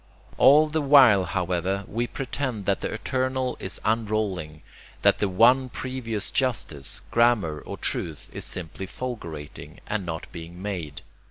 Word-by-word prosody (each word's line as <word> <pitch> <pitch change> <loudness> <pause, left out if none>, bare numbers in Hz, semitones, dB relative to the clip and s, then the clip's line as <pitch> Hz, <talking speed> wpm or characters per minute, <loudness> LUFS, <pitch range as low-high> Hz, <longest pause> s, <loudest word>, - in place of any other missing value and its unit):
All 150 +3 +7
the 155 +1 -1
while, 130 -9 +7
however, 90 +2 -1
we 120 +3 -2
pretend 130 -5 -4
that 100 0 +1
the - - -2
eternal 130 +2 -1
is 95 - -4
unrolling, 105 -8 -1 0.4
that - - +5
the 100 - +1
one 125 +7 +5
previous 115 -5 -3
justice, 115 - -2
grammar 115 -10 +3
or - - -8
truth 80 -4 -3
is - - -5
simply 90 +2 -5
fulgurating, 85 - -7
and 105 -2 -2
not 80 -2 -5
being 85 +1 -9
made. 90 -8 -5
105 Hz, 140 wpm, -25 LUFS, 90-125 Hz, 0.4 s, All